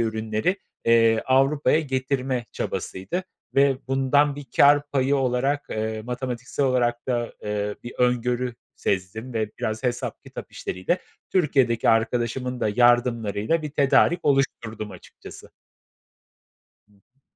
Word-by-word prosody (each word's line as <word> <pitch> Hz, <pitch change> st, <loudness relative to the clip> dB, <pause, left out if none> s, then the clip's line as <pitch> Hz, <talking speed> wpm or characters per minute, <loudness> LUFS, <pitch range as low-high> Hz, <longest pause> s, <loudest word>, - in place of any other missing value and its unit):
ürünleri, 110 Hz, -, -1 dB, 0.3 s
eee, 115 Hz, -1 st, +4 dB
Avrupa'ya 140 Hz, +4 st, +3 dB
getirme 130 Hz, -2 st, -2 dB
çabasıydı 165 Hz, -, -4 dB, 0.3 s
ve 140 Hz, -1 st, +4 dB
bundan 140 Hz, +2 st, +2 dB
bir 145 Hz, -2 st, -8 dB
kâr 145 Hz, +1 st, +5 dB
payı 135 Hz, +1 st, +2 dB
olarak, 135 Hz, +2 st, 0 dB
eee, 110 Hz, 0 st, -3 dB
matematiksel 125 Hz, +2 st, -3 dB
olarak 120 Hz, -1 st, 0 dB
da, 120 Hz, -2 st, -1 dB
eee, 105 Hz, 0 st, -2 dB
bir 120 Hz, -, -7 dB
öngörü 125 Hz, 0 st, +1 dB, 0.2 s
sezdim 100 Hz, +6 st, -3 dB
ve 110 Hz, -2 st, -1 dB
biraz 110 Hz, +1 st, -3 dB
hesap 125 Hz, -1 st, -3 dB
kitap -, -, -9 dB
işleriyle, 95 Hz, -, -2 dB, 0.3 s
Türkiye'deki 135 Hz, -9 st, +2 dB
arkadaşımın 120 Hz, +2 st, 0 dB
da -, -, +1 dB
yardımlarıyla 120 Hz, +3 st, +2 dB
bir 150 Hz, -, -4 dB
tedarik 145 Hz, +4 st, +3 dB
oluşturdum 115 Hz, -6 st, 0 dB
açıkçası. 90 Hz, -, -13 dB, 1.4 s
Hı 105 Hz, -, -28 dB
hı. 120 Hz, +7 st, -34 dB
125 Hz, 120 wpm, -24 LUFS, 115-135 Hz, 1.4 s, kâr